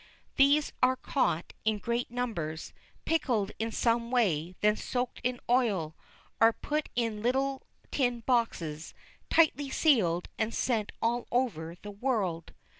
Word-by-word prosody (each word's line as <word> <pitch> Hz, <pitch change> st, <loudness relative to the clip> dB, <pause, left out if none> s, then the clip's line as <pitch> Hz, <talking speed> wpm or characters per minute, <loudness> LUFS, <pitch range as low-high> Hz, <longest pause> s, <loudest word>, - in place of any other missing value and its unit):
These 285 Hz, +2 st, +4 dB
are 255 Hz, +1 st, +4 dB
caught 250 Hz, -, -1 dB
in 220 Hz, -1 st, +1 dB
great 235 Hz, +3 st, -2 dB
numbers, 210 Hz, -11 st, -4 dB, 0.3 s
pickled 235 Hz, -11 st, +1 dB
in 225 Hz, +1 st, -1 dB
some 235 Hz, +1 st, +1 dB
way, 185 Hz, -9 st, +1 dB
then 210 Hz, 0 st, +4 dB
soaked 245 Hz, +2 st, -3 dB
in 250 Hz, 0 st, -1 dB
oil, 210 Hz, -11 st, +1 dB, 0.4 s
are 225 Hz, 0 st, +7 dB
put 300 Hz, +7 st, -3 dB
in 230 Hz, -3 st, -1 dB
little 265 Hz, +3 st, 0 dB, 0.3 s
tin 245 Hz, -4 st, 0 dB
boxes, 175 Hz, -, -1 dB, 0.3 s
tightly 295 Hz, -4 st, +3 dB
sealed, 205 Hz, -, +2 dB
and 220 Hz, +1 st, -1 dB
sent 220 Hz, -5 st, 0 dB
all 235 Hz, +1 st, 0 dB
over 190 Hz, -10 st, -1 dB
the 205 Hz, -, -6 dB
world. 200 Hz, -7 st, -2 dB
235 Hz, 130 wpm, -30 LUFS, 205-255 Hz, 0.4 s, are